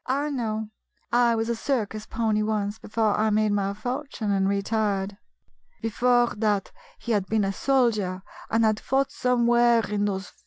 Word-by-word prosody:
"I 285 +3 0
know: 220 -4 -3 0.4
I 240 -1 +4
was 225 0 -1
a 235 - 0
circus 220 -4 -2
pony 220 -2 0
once, 210 0 -1
before 215 -1 0
I 220 0 +2
made 215 0 +2
my 200 -1 0
fortune 245 -1 -3
and 195 -1 +2
retired." 200 -1 -1 0.3
" - - -40
Before 240 +2 +2
that 210 -2 0 0.3
he 235 - -5
had 200 -3 +1
been 215 0 +1
a 195 0 -1
soldier, 215 -7 +1 0.3
and 225 0 +2
had 215 -1 +2
fought 270 +1 0
somewhere 240 -3 +3
in 205 0 -1
those 195 -2 -3
220 Hz, 165 wpm, -25 LUFS, 205-240 Hz, 0.4 s, I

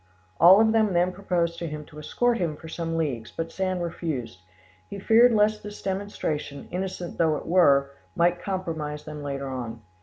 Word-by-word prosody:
All 180 +5 +8
of 220 0 +4
them 220 -3 +2
then 175 +1 +2
proposed 175 -3 -1
to 170 - -3
him 150 -1 -6
to 150 - -12
escort 235 +10 0
him 165 -4 -1
for 160 - -12
some 165 0 -3
leagues, 130 -9 -2
but 165 0 -5
Sand 185 -2 -2
refused; 155 - -4 0.5
he 200 - -6
feared 225 +5 +5
lest 215 -1 +2
this 205 0 -9
demonstration, 190 -7 -3
innocent 180 -1 -5
though 160 -2 +3
it - - -8
were, 140 -6 +4 0.2
might 175 +1 +2
compromise 160 -6 -4
them 150 -1 -7
later 140 -1 -4
on. 120 -4 -6
170 Hz, 180 wpm, -26 LUFS, 150-190 Hz, 0.5 s, All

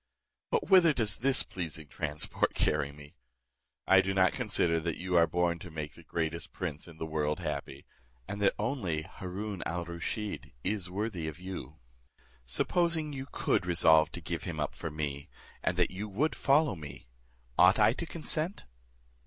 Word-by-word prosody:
But 470 -3 0
whither 175 -4 +7
does 110 -5 +1
this 135 +1 +4
pleasing 80 -4 -5
transport 75 +2 -1
carry 75 -2 +1
me? 75 0 -14 0.7
I 95 0 +7
do 95 0 -2
not 95 -1 +4
consider 95 -8 +2
that 80 0 -2
you 90 0 -2
are 85 -1 +6
born 85 +1 +1
to 90 - -9
make 75 -2 -5
the - - -14
greatest 80 +1 -3
prince 80 -5 -5
in 80 -2 -12
the 80 - -4
world 75 -1 -1
happy; 70 +1 -5 0.4
and 100 +1 -5
that 100 - +3
only 105 - -1
Haroon 95 +3 -6
al 85 0 -3
Rusheed 85 - -4
is 95 -2 -1
worthy 95 -4 -3
of 80 -1 -5
you. 90 -6 -7 0.7
Supposing 160 - +1
you 135 0 -5
could 95 - 0
resolve 80 -3 +5
to - - -5
give - - -3
him - - -4
up - - -1
for 80 - -5
me, 75 -2 -4 0.3
and 90 - 0
that 90 - +2
you 100 +3 -5
would 140 +11 +1
follow 145 -3 +3
me, 75 -6 -10 0.5
ought - - +7
I 115 - +5
to 170 - -4
consent? 165 +3 -1
90 Hz, 170 wpm, -31 LUFS, 80-105 Hz, 0.7 s, whither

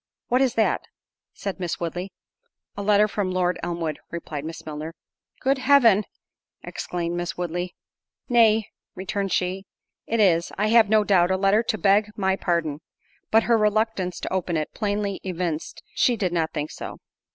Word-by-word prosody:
"What 250 +2 +3
is 260 -3 +2
that?" 220 - +2 0.5
said 195 -1 -5
Miss 175 -3 -3
Woodley. 175 +3 -4 0.6
"A 200 - -4
letter 210 +1 +4
from 200 -2 -2
Lord 180 -1 0
Elmwood," 170 -3 -3
replied 155 -4 -5
Miss 160 0 -7
Milner. 155 +1 -6 0.5
"Good 270 +1 +2
Heaven!" 245 -7 +5 0.6
exclaimed 175 -1 -4
Miss 175 0 -3
Woodley. 175 +1 -3 0.5
"Nay," 225 -3 +4 0.3
returned 195 +1 -3
she, 185 +2 -1 0.4
"it 230 - 0
is, 170 -5 +3
I 210 +1 +1
have 225 -2 +5
no 215 0 +5
doubt, 185 -4 +3
a 190 - +2
letter 195 +3 +3
to 225 -2 -2
beg 205 +1 +3
my 190 -2 +1
pardon." 165 -6 -1 0.5
But 225 0 +4
her 230 -2 +3
reluctance 210 -4 0
to - - -4
open 180 -3 0
it 155 - -3
plainly 205 -1 -2
evinced 175 -4 -4
she 245 - +3
did 185 -4 -1
not 165 -2 0
think 150 -1 -3
so. - - -7
190 Hz, 165 wpm, -24 LUFS, 175-215 Hz, 0.6 s, Heaven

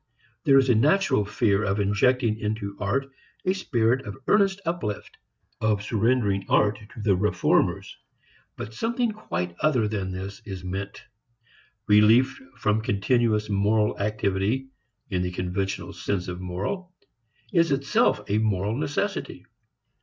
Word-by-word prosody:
There 135 -2 +6
is 135 -1 +4
a 125 - +5
natural 145 - +3
fear 100 -1 +1
of 100 0 0
injecting 110 +3 +2
into 105 -2 -3
art 120 +7 -1 0.4
a 185 - +3
spirit 125 -8 +1
of 100 - -6
earnest 200 -2 +3
uplift, 165 - -3 0.5
of 105 -2 +1
surrendering 105 -2 +1
art 105 0 +3 0.2
to - - -9
the 100 -3 +3
reformers. 105 +3 +1 0.6
But 110 - -7
something 235 - 0
quite 90 - -4
other 130 -8 +2
than 100 -3 -3
this 95 +2 -6
is 95 -3 -7
meant. 95 +2 -5 0.8
Relief 110 - +4 0.2
from 105 +1 +1
continuous 110 +1 +1
moral 105 +1 +2
activity 105 +5 -1 0.4
in 90 -1 0
the 90 - -1
conventional 90 +2 -3
sense 95 -3 -3
of 90 0 -5
moral 175 - -4 0.6
is 170 -4 +3
itself 140 -6 +2
a 105 +1 +1
moral 105 -1 0
necessity. 150 +8 -3
105 Hz, 130 wpm, -25 LUFS, 100-130 Hz, 0.8 s, There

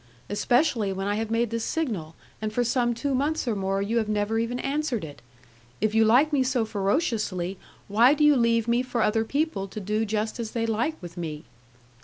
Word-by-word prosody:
especially 235 -1 +2
when 195 0 -3
I 205 - 0
have 220 +1 -2
made 230 0 0
the 230 - -1
signal, 220 - -3 0.3
and 215 0 -2
for 245 +3 +1
some 240 0 +1
two 280 +4 -2
months 285 +2 0
or 230 - +1
more 195 0 -1
you 230 +3 +1
have 220 -2 -2
never 210 +1 0
even 230 +2 -1
answered 275 - -1
it! 145 -2 -11 0.6
If 215 0 0
you 225 0 +5
like 265 +8 +4
me 280 - +3
so 255 -3 +1
ferociously, 200 - -1 0.3
why 235 +7 +5
do 300 - +1
you 295 -1 +6
leave 230 -2 +2
me 235 +1 +2
for 250 -3 -1
other 220 +1 +2
people 275 -6 -1
to 205 - -7
do 210 +2 -1
just 220 +2 -2
as 225 -2 -4
they 230 - +1
like 235 +8 -1
with 175 0 -9
me?' 155 -3 -5
225 Hz, 210 wpm, -26 LUFS, 205-250 Hz, 0.6 s, you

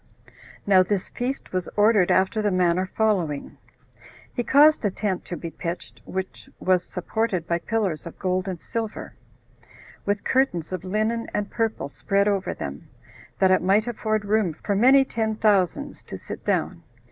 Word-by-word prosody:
Now 190 -2 +6
this 185 +1 -1
feast 255 -2 -4
was 185 -2 -2
ordered 205 -3 +4
after 190 +3 +2
the 210 - +1
manner 185 0 +2
following: 180 -10 0 0.7
He 245 - -1
caused 295 +4 +5
a 205 - +2
tent 190 -1 -3
to 175 - -5
be 165 - -6
pitched, 170 +2 -6
which 190 0 -5
was 185 -1 +2
supported 185 -1 -2
by 170 0 0
pillars 195 -6 -2
of 170 - -10
gold 185 0 -1
and 185 -3 -4
silver, 225 +2 -5 0.9
with 205 0 -1
curtains 255 - +1
of 185 - -4
linen 215 +4 -1
and 205 0 -2
purple 225 -10 -1
spread 200 +7 0
over 200 -2 0
them, 70 +1 -7 0.5
that 190 -1 +4
it 185 - +4
might 195 +4 +3
afford 215 -3 -1
room 205 -4 +1
for 200 +4 -2
many 265 +6 +6
ten 220 -3 -1
thousands 215 +6 +1
to - - -7
sit - - -8
down. - - -1
200 Hz, 160 wpm, -24 LUFS, 185-220 Hz, 0.9 s, Now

